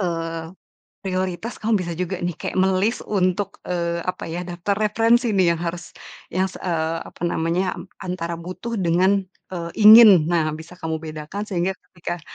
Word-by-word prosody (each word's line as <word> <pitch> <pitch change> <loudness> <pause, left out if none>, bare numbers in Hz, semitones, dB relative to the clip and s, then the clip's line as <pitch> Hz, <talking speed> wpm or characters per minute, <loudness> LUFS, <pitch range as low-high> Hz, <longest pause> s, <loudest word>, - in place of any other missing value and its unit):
eee, 165 -2 -3 0.5
prioritas 185 +4 -2
kamu 220 +1 +1
bisa 170 - -4
juga 180 +1 -2
nih 175 - -1
kayak - - -5
me-list 190 +4 +1
untuk, 195 0 -1
eee, 170 -1 -1
apa 185 - -3
ya, 175 +2 -3
daftar 175 +3 -2
referensi 230 +2 +3
nih 180 -3 +4
yang 165 - -9
harus 170 0 -5 0.4
yang 185 +2 +1
se - - -11
eee, 165 -2 -1
apa - - -12
namanya, 170 +3 -1 0.2
antara 175 -2 -4
butuh 185 +7 -5
dengan, 185 +2 +2 0.3
eee, 170 -2 -4
ingin. 215 -6 +9
Nah, 165 -3 +1
bisa 165 +3 -11
kamu 160 -2 -3
bedakan 155 +5 -6
sehingga 185 0 0 0.2
ketika 175 0 -5
180 Hz, 160 wpm, -22 LUFS, 170-190 Hz, 0.5 s, ingin